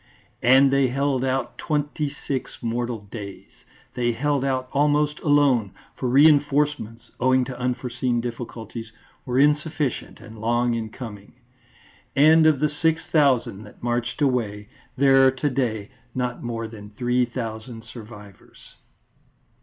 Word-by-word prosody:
_" - - -33 0.4
And 135 +2 +6
they 140 -1 +4
held 135 0 0
out 130 -1 -2
twenty 150 -1 -1 0.2
six 135 -2 -3
mortal 120 -1 -2
days. 100 -4 -8 0.4
They 120 -1 0
held 140 +2 0
out 130 -1 -1
almost 150 +1 +2
alone, 140 - +3 0.2
for 130 - -2
reinforcements, 145 -3 +3
owing 130 0 +3
to 125 -1 -7
unforeseen 125 0 -1
difficulties, 115 -1 -6 0.4
were 125 0 -1
insufficient 150 -1 0
and 110 -2 -12
long 120 +1 +1
in 115 -1 -3
coming. 105 -3 -9 0.8
And 155 +3 +6
of 155 -4 +3
the 150 - +3
six 160 +2 0
thousand 130 -9 +2
that 105 - -16
marched 120 +4 -1
away, 105 -6 -1 0.3
there 135 0 +6
are - - +4
to 140 +2 -1
day 115 -5 -2 0.2
not 125 -1 -2
more 115 -1 -4
than 105 -2 -11
three 125 0 +2
thousand 115 -1 -6
survivors. 105 -4 -13
125 Hz, 135 wpm, -23 LUFS, 115-140 Hz, 0.8 s, And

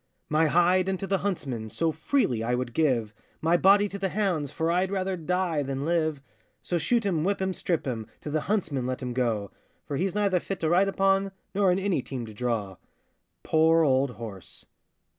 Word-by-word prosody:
My 155 +1 +3
hide 180 +4 +3
unto 190 0 -2
the 195 -1 0
huntsman 135 - -3
So 165 +8 0
freely 160 - 0
I 120 +2 0
would 125 -1 -3
give, 120 -8 +1 0.3
My 165 +2 +2
body 200 +3 +5
to 200 - -6
the 195 0 -1
hounds, 180 -8 0
For 165 +4 -1
I'd 180 +2 +1
rather 190 -1 -1
die 175 -2 -1
than 135 0 -3
live: 155 -4 0 0.4
So 175 - -1
shoot 230 +7 +1
him, 170 -6 +1
whip 200 +3 0
him, 190 0 -1
strip 175 -3 -2
him, 115 -5 -3
To 150 - -6
the 155 0 0
huntsman 155 - -1
let 130 +1 -3
him 125 -1 -3
go; 115 -5 -1 0.3
For 140 -2 -3
he's 190 +4 -1
neither 200 -3 +2
fit 195 +1 -5
to 160 - +1
ride 180 +4 +4
upon, 195 0 +1 0.2
Nor 195 -2 +3
in 180 - +2
any 195 -6 0
team 125 -2 -6
to 110 - -10
draw. 105 -5 -2 0.7
Poor 160 +1 +4
old 135 -1 +3
horse! 105 -6 -9
165 Hz, 200 wpm, -27 LUFS, 130-190 Hz, 0.7 s, body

